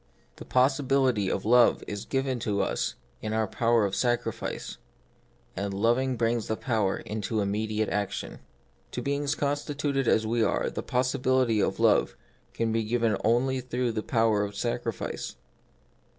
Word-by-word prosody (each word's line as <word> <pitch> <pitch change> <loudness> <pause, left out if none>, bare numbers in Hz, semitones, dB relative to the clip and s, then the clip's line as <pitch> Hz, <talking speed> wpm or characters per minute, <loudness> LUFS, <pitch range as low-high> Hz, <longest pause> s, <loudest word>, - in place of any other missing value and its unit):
The - - -9
possibility 130 -5 +2
of - - -2
love 120 +1 +5
is 100 -1 -5
given 135 -2 -1
to 105 -2 -1
us - - -1 0.3
in 110 - -3
our 110 0 +1
power 115 +1 +2
of 100 -1 -2
sacrifice; 120 +4 -2 0.8
and 100 0 -3
lov 115 +5 +3
ing 130 -1 -1
brings 115 -1 0
the 110 - -1
power 110 -6 0
into 110 +1 -3
immediate 105 +1 -1
action. 105 -1 -3 0.5
To - - -3
beings 140 +1 0
constituted 145 -2 -1
as 110 - +3
we 115 +1 0
are - - 0
the - - -4
possi 125 +1 0
bility 130 -5 +3
of - - -1
love - - +3 0.4
can 115 -1 -1
be 115 0 +1
given 115 -1 +1
only 130 +3 +2
through 125 -1 -1
the 110 -1 -2
power 110 -2 +2
of 100 0 -5
sacrifice. 115 0 -3
115 Hz, 155 wpm, -27 LUFS, 110-130 Hz, 0.8 s, love